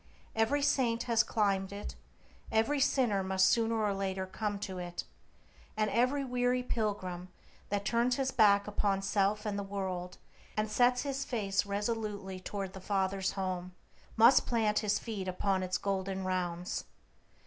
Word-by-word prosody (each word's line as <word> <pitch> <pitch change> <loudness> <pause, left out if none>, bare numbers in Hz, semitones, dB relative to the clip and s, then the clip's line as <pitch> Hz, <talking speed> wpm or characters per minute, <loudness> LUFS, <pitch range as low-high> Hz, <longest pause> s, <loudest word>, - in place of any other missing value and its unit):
Every 265 +6 +2
saint 235 -5 +2
has 230 -2 +3
climbed 195 -4 0
it; 200 +1 -6 0.6
every 225 +7 +2
sinner 245 -7 +2
must 190 0 +2
sooner 225 0 +2
or 205 -1 +1
later 190 -1 -2
come 205 +2 -3
to 190 -3 -4
it, 175 -1 -5 0.7
and 215 -1 +1
every 255 +4 +2
weary 250 0 +1
pilgrim 190 -6 -2 0.4
that 200 0 -1
turns 240 +1 +2
his 265 0 0
back 200 -4 +5
upon 200 -2 0
self 200 +2 +1
and 205 -1 -1
the - - -3
world, 190 -2 -4 0.4
and 215 0 0
sets 245 +2 +3
his 275 -1 -2
face 205 -6 -1
resolutely 205 -2 -3
toward 195 0 -5
the 190 - -9
Father's 190 -1 0
Home, 185 -2 -3 0.4
must 235 +4 +6
plant 220 -3 +2
his 210 -1 +1
feet 205 -5 -5
upon 190 +1 0
its 185 -1 -1
golden 190 -1 -2
rounds. 180 -1 -2
205 Hz, 150 wpm, -32 LUFS, 190-230 Hz, 0.7 s, must